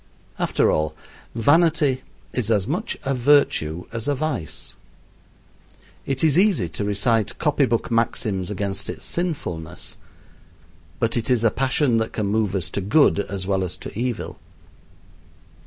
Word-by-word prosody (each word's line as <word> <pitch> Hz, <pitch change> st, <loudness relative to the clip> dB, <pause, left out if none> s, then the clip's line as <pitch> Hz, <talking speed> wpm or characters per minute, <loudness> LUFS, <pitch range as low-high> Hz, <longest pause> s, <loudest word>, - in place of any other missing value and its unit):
After -, -, +2 dB
all, 75 Hz, 0 st, 0 dB, 0.4 s
vanity 145 Hz, +1 st, +3 dB, 0.3 s
is 120 Hz, -4 st, -1 dB
as 105 Hz, -4 st, +2 dB
much 180 Hz, -, -2 dB
a 135 Hz, -, 0 dB
virtue 120 Hz, -, +2 dB
as 115 Hz, +1 st, -4 dB
a 145 Hz, -, +2 dB
vice. 135 Hz, -, -4 dB, 1.3 s
It 135 Hz, +1 st, -1 dB
is 160 Hz, +1 st, +4 dB
easy 190 Hz, -, +3 dB
to 105 Hz, -, -4 dB
recite 105 Hz, +2 st, +1 dB
copy 150 Hz, -2 st, +2 dB
book 120 Hz, -1 st, -1 dB
maxims 105 Hz, -5 st, 0 dB
against 100 Hz, -1 st, -3 dB
its -, -, -6 dB
sinfulness, 115 Hz, -, -4 dB, 1.0 s
but 115 Hz, 0 st, +1 dB
it 120 Hz, +1 st, -1 dB
is 125 Hz, -3 st, +3 dB
a 115 Hz, -, +4 dB
passion 135 Hz, -2 st, +2 dB
that 110 Hz, 0 st, -1 dB
can 105 Hz, -, -1 dB
move 105 Hz, -1 st, 0 dB
us 90 Hz, -4 st, -2 dB
to 100 Hz, -, -2 dB
good 105 Hz, +4 st, +4 dB
as 100 Hz, -2 st, -3 dB
well 95 Hz, -1 st, +1 dB
as 90 Hz, -1 st, -4 dB
to -, -, -9 dB
evil. 120 Hz, +1 st, -3 dB
115 Hz, 145 wpm, -23 LUFS, 100-140 Hz, 1.3 s, is